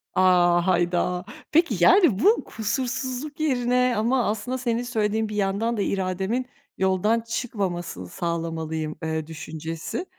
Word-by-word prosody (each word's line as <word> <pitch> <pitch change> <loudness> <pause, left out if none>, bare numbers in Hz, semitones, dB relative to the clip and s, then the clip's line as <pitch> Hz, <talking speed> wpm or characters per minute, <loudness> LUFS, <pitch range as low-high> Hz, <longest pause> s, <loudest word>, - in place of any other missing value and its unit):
A, 175 -1 +4
hayda. 180 0 +1 0.3
Peki 305 - +3
yani, 330 - +6
bu 425 - +4
kusursuzluk 255 +5 -3
yerine 250 -3 +2
ama 240 +3 +2
aslında 220 +5 -2
senin 240 -1 -1
söylediğin 220 -2 0
bir 210 - -5
yandan 210 +3 0
da - - 0
irademin 195 +6 -1 0.3
yoldan 190 +4 +2
çıkmamasını 195 - -3
sağlamalıyım, 160 - -3
ııı, 160 -1 -2
düşüncesi. 160 - -5
205 Hz, 120 wpm, -24 LUFS, 175-245 Hz, 0.3 s, yani